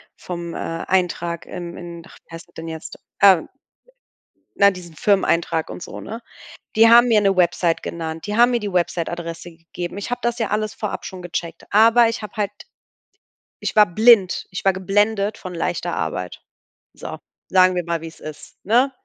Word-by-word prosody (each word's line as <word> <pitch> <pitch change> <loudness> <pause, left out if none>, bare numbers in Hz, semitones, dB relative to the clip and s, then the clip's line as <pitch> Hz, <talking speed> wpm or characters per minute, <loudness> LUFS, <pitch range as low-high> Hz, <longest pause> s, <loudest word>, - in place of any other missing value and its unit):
vom, 170 -1 -6
äh, - - -5 0.3
Eintrag 175 -2 -1
im 175 -1 -7
in 170 -1 -9
ach, - - -16
wie 165 - -10
heißt 165 - -11
das - - -28
denn 165 0 -7
jetzt, 160 -1 -8 0.2
ähm 190 -4 +6 1.1
na, 200 0 +7
diesen 175 -3 -11
Firmeneintrag 170 -4 +1
und - - -7
so, - - -8
ne? 225 +2 -7 0.6
Die 225 +1 +7
haben 240 +1 +7
mir 215 -3 +4
'ne 195 -1 +3
Website 170 -1 +2
genannt, 160 -1 -5
die 210 - -3
haben 240 +1 +6
mir 240 -1 0
die 205 -1 -4
Websiteadresse 170 -1 -2
gegeben. 175 +2 -7
Ich 200 +3 -5
habe 245 - -2
das 240 0 -1
ja 225 - -1
alles 215 0 -1
vorab 210 - -5
schon 185 -1 -8
gecheckt, 170 -1 -5
aber 230 +3 +6
ich 230 - -5
habe 210 - -8
halt 205 -2 -1 1.1
ich - - -4
war 210 -1 +7
blind, 210 +1 +4
ich 185 - -6
war 195 - +5
geblendet 205 +2 0
von 185 -2 -8
leichter 165 - -2
Arbeit. 90 -1 -4 0.5
So, - - -7 0.3
sagen 185 0 +5
wir 180 - -1
mal, 170 -1 -2
wie's 165 0 -10
ist, 155 -1 -10
ne? 245 +7 +3
185 Hz, 185 wpm, -21 LUFS, 170-210 Hz, 1.1 s, na